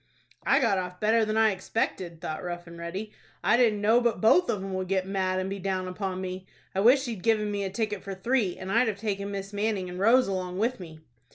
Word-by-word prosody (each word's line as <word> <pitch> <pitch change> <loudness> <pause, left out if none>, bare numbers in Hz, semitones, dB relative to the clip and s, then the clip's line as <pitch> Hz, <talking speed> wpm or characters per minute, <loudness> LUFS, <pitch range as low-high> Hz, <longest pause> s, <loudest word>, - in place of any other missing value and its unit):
"I - - +5
got 225 -7 +2
off 180 0 -6
better 220 +1 +3
than 215 +1 -1
I 220 -1 +5
expected," 180 -3 -3
thought 155 +3 -4
Rough 175 -1 -5
and 170 0 -11
Ready. 180 +6 -5 0.3
"I - - +4
didn't 225 -4 +3
know 225 +4 +4
but 235 -1 +1
both 350 +11 +4
of 195 -2 -1
'em 195 -1 -5
would 185 0 -2
get 190 0 0
mad, 190 -1 -1
and 185 - -2
be 195 +1 -4
down 185 -1 -2
upon 185 0 -4
me. 185 0 -6 0.3
I 190 - -1
wish 255 +7 +5
he'd 225 -6 -5
given 210 0 +1
me 200 -1 -2
a - - -2
ticket 210 0 -2
for 195 -1 -6
three, 210 -1 0
and 190 +1 -6
I'd 235 +4 +3
have 210 -3 -1
taken 200 -1 -3
Miss 195 0 -5
Manning 205 -3 -1
and 180 0 -7
Rose 235 +5 +5
along 185 -2 -3
with 235 +4 0
me." 160 -3 -10
195 Hz, 245 wpm, -27 LUFS, 185-220 Hz, 0.3 s, I